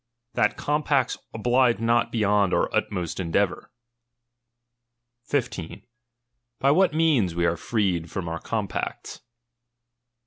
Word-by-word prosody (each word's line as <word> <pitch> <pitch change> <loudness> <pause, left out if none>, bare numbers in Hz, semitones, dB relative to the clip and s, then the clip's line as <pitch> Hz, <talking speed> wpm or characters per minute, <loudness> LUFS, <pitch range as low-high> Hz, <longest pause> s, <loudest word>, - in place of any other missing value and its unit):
That 105 +2 +1
compacts 145 -3 +1 0.2
oblige 120 +2 +2
not 115 +1 +1
beyond 105 -3 +2
our - - 0
utmost 90 -4 -2
endeavour. 95 +2 -1 1.6
15. 125 - -3 0.8
By 140 - +4
what 185 +5 +4
means 150 - +2
we 85 0 +1
are 85 0 +2
freed 90 -4 -1
from 90 +1 -4
our 85 +1 -3
compacts. 105 -1 -4
105 Hz, 105 wpm, -25 LUFS, 90-125 Hz, 1.6 s, By